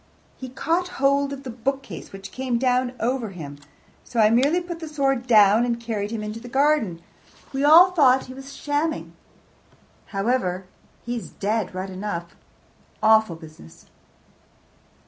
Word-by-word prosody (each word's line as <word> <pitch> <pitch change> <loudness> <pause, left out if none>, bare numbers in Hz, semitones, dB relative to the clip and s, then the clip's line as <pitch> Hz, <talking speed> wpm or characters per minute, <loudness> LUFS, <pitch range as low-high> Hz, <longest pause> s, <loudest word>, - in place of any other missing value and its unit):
"He 260 - -8
caught 335 +8 -1
hold 280 +1 +2
of 275 -1 -7
the 255 - -6
bookcase, 270 +4 -4
which 195 0 -9
came 255 -2 -2
down 250 0 +1
over 240 -1 -1
him. 145 -6 -9 0.4
So 240 - -4
I 215 0 +5
merely 280 +9 +3
put 345 -1 -7
the 325 - -6
sword 270 -4 0
down 215 -1 +6
and 235 -1 -1
carried 220 -3 -3
him 220 -1 -4
into 210 +1 -5
the 240 - -11
garden. 265 - +1 0.5
We 270 +1 -1
all 335 +5 +8
thought 265 -7 +4
he 255 - -10
was 270 +1 -10
shamming. 295 +2 -2 0.9
However, 195 -3 -1 0.4
he's 240 -1 -4
dead 210 -2 -2
right 190 +1 -4
enough. 185 -3 -5 0.7
Awful 220 -4 +4
business!" 155 - -14
245 Hz, 145 wpm, -23 LUFS, 210-275 Hz, 0.9 s, all